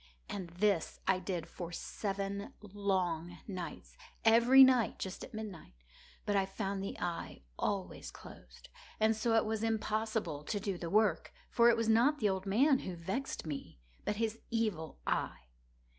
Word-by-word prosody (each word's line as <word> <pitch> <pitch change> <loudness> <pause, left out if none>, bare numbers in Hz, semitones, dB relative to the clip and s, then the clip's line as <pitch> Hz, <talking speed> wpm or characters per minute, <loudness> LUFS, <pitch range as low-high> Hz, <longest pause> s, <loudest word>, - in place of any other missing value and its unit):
And 190 -4 -5
this 180 0 0
I 190 -1 +3
did 180 -2 -3
for 175 -2 -7
seven 200 +2 -4
long 185 -4 -1
nights—every 225 +6 +3
night 255 -3 +4
just 190 - -5
at - - -9
midnight—but 165 - -7
I 195 - +4
found 195 0 -3
the 195 - -5
eye 175 -1 -4 0.2
always 195 -2 -2
closed; - - -13 0.3
and 220 +1 +4
so 225 +1 +1
it 225 - +4
was 220 0 -1
impossible 220 -7 -1
to 205 - -1
do 195 -3 -3
the 170 - -4
work; 210 -4 +2 0.2
for 235 0 +6
it 235 - +4
was 230 -1 0
not 240 +7 +4
the 215 -6 +2
old 190 0 -2
man 265 +7 +4
who 185 - -5
vexed 190 +11 -4
me, 140 - -6 0.2
but - - -1
his 225 +1 -1
Evil 215 -9 -1
Eye. - - -1
200 Hz, 155 wpm, -33 LUFS, 180-225 Hz, 0.3 s, for